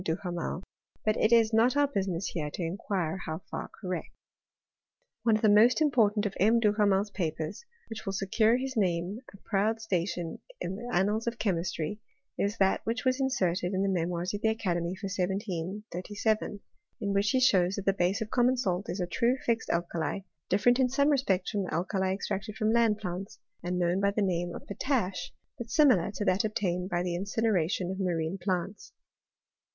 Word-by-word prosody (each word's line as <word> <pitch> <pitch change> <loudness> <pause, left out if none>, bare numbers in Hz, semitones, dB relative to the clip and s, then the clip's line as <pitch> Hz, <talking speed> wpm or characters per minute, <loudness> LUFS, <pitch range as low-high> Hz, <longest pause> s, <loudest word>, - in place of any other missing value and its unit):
Duhamel; 175 +1 -3 0.4
but 215 0 +3
it 220 - +2
is 230 -1 +5
not 235 +5 +4
our 290 0 +4
businiess 195 -8 -2
here 150 -4 -2
to 180 - -3
inquire 180 0 -2
how 160 +3 -4
far - - -4
correct. 180 -3 -4 1.1
One 225 -1 +3
of 215 - -2
the - - +6
most 215 +6 +6
important 225 -8 +3
of 200 - -1
M. 225 +4 +5
Duhamel's 205 -2 +2
papers, 160 - -3 0.2
which 225 -1 -7
will 195 - -3
secure 215 +4 +2
his 265 +1 -4
name 185 0 0
a 200 - -14
proud 215 +2 +1
station 175 -5 -2 0.2
in 185 - -3
the 240 +3 -7
annals 210 +5 +1
of 235 0 -1
chemistry, 175 -1 -2 0.3
is 200 +2 -1
that 195 -1 +2
which 235 +4 -2
was 255 +1 +2
inserted 185 -8 0
in 190 - +1
the 195 - +1
Memoirs 175 +2 -2
of 205 - -3
the 220 - +3
Academy 180 -5 -1
for 195 +2 -7
1737, 195 +2 -2 0.4
in 200 -2 -1
which 200 +1 +2
he 260 - +3
shows 190 -7 +4
that 200 - -5
the 195 - +3
base 195 +3 0
of 215 - -4
common 250 +1 +3
salt 195 -5 -1
is 185 - -3
a 180 - 0
true 235 +8 +1
fixed 230 -1 0
alkali, 170 +2 -1 0.3
different 245 +6 +3
in 255 -1 +3
some 280 +3 +2
respects 225 -10 +1
from 205 -3 0
the - - -6
alkali 190 +2 0
ex 195 - -3
tracted 200 +2 -3
from 215 0 +1
land 230 -3 +3
plants, 185 -1 -5 0.2
and 180 +1 -2
known 175 +1 +1
by 200 0 +3
the 205 +1 0
name 175 -2 -1
of - - -8
potash^ 200 -6 -1 0.3
but 235 -1 -6
similar 255 - +4
to 205 +1 -4
that 190 0 +2
obtained 190 -4 -1
by 175 -1 0
the 180 -1 -2
incinera 200 -2 +1
tion 185 -1 -1
of 190 - -5
marine 175 -1 -1
plants. 185 +2 -3
200 Hz, 190 wpm, -29 LUFS, 180-220 Hz, 1.1 s, the